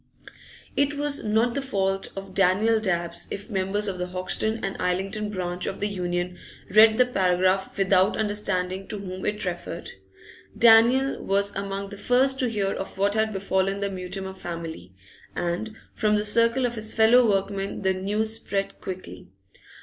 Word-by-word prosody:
It 285 +1 +2
was 290 0 -1
not 220 +3 +2
the 280 - -2
fault 195 -7 -1
of 195 -1 -8
Daniel 200 +4 +3
Dabbs 170 -4 -1
if 205 +4 -7
members 200 +2 -1
of 190 -2 -3
the 180 - -2
Hoxton 185 +5 -2
and 195 - -3
Islington 195 +4 -1
branch 180 -3 -3
of - - -4
the 205 - 0
Union 180 -2 -3 0.3
read 220 +2 +7
the 250 - +5
paragraph 185 -3 +1
without 190 -1 +3
understanding 195 -3 -1
to 210 - -5
whom 185 -2 -6
it 210 -1 -2
referred. 175 -1 -5 0.7
Daniel 235 +4 +5
was 200 +1 0
among 195 0 -4
the 200 - -9
first 265 +2 +3
to 255 - +1
hear 200 -3 -1
of 195 - -6
what 200 +1 +2
had 220 0 +1
befallen 195 0 0
the 200 0 -2
Mutimer 190 +1 -5
family, 165 - -7 0.4
and 175 +6 -3 0.2
from 210 -1 +1
the 210 0 0
circle 230 +4 +3
of 240 - -1
his 220 -1 -2
fellow 225 +3 +6
workmen 195 0 -1
the 190 0 +2
news 210 +4 0
spread 195 -3 -3
quickly. 180 - -8
195 Hz, 165 wpm, -25 LUFS, 185-220 Hz, 0.7 s, read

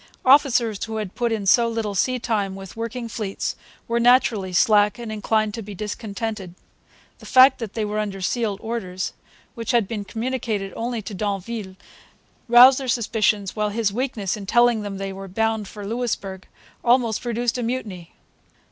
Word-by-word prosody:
Officers 255 -6 +4
who 225 0 -6
had 210 -4 -4
put 240 -1 -1
in 215 -3 -2
so 235 +4 +5
little 225 -3 -2
sea 255 +6 +1
time 210 -5 -1
with 195 -1 -10
working 230 +1 -4
fleets 210 -3 -4 0.3
were 235 0 0
naturally 235 -5 +3
slack 210 +2 +4
and 235 -2 -6
inclined 215 0 0
to 230 - -5
be 205 -1 -8
discontented. 210 -2 -5 0.6
The - - -12
fact 260 0 +6
that 225 -4 -6
they 220 -2 -1
were 210 +1 -2
under 200 -2 -3
sealed 205 +1 -1
orders, 190 -5 -4 0.4
which 230 -3 -7
had 235 -5 +3
been 210 -1 -4
communicated 220 -3 -3
only 235 -1 -3
to 200 - -7
d'Anville, 200 0 -4 0.7
roused 250 +3 +8
their 265 - -5
suspicions 215 -4 0
while 210 -1 0
his 210 -1 -1
weakness 230 -5 -2
in 200 -2 -8
telling 240 0 +4
them 200 -1 -5
they 195 0 -4
were 195 0 -8
bound 220 +2 -1
for 205 0 -9
Louisbourg 205 -4 -3 0.4
almost 235 -3 +2
produced 240 0 -1
a - - -1
mutiny. 225 -8 -5
220 Hz, 170 wpm, -23 LUFS, 200-235 Hz, 0.7 s, roused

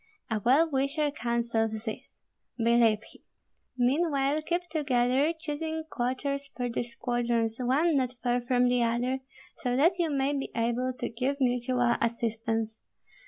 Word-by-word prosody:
A 215 -1 0
well 280 +7 +5
wisher 285 +1 0
counsels 235 -4 -1
this, 220 - -7 0.4
believe 230 -2 +3
him. - - -16 0.6
Meanwhile 280 +2 +2
keep 345 +3 -1
together, 280 -3 +1
choosing 320 +1 -3
quarters 275 +3 -1
for 250 -2 -4
the 235 - -1
squadrons 235 -1 -1
one 280 +6 +2
not 255 -1 0
far 245 0 +1
from 245 0 +2
the 245 0 +2
other, 240 +3 0 0.4
so 245 -1 -1
that 335 +7 +3
you 335 -2 +2
may 280 0 +1
be 275 -1 -3
able 240 +2 0
to - - -2
give 255 +5 -2
mutual 245 -1 +2
assistance. 225 -1 -1
250 Hz, 140 wpm, -29 LUFS, 235-280 Hz, 0.6 s, well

